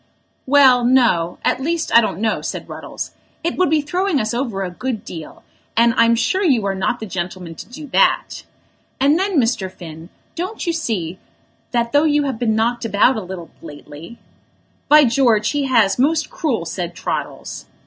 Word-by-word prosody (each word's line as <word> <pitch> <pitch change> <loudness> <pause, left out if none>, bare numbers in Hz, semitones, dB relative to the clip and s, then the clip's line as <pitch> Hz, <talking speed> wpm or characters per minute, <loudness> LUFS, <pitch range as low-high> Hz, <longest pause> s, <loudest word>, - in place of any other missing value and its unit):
"Well, 260 -3 +6
no; 240 -10 +2
at 255 - +1
least 325 0 -1
I 235 - +9
don't 215 - -2
know," 220 0 0
said - - -5
Ruddles. - - -7 0.3
"It 340 - -1
would 365 -4 +2
be 310 0 +2
throwing 360 +1 0
us 215 +1 -2
over 235 -6 -2
a 180 - -4
good 235 +3 -4
deal, 160 -3 -9 0.3
and 230 0 +5
I'm 230 0 +4
sure 370 - 0
you 255 - +2
are 195 - 0
not 195 +5 -1
the 220 - -5
gentleman 180 -2 -5
to 165 - -11
do 300 +5 -9
that. - - +2 0.6
And 285 +5 +3
then, 380 -4 +1
Mr. 225 -6 0
Finn, 165 -2 -11 0.2
don't 370 +6 -5
you 340 - 0
see 190 - -3 0.5
that 235 -1 -1
though 290 +2 +4
you 295 -1 +2
have 270 -5 -3
been 220 -3 +1
knocked 235 +2 0
about 230 +3 +3
a 220 - -3
little 180 -3 -8
lately 150 +8 -11 0.4
" - - -40
"By 300 0 +8
George, 230 -4 +2
he 290 -1 -1
has, 230 -5 +2
most 310 +4 +1
cruel," 245 - -2
said 175 +1 -5
Troddles. - - -5
235 Hz, 185 wpm, -19 LUFS, 195-290 Hz, 0.6 s, I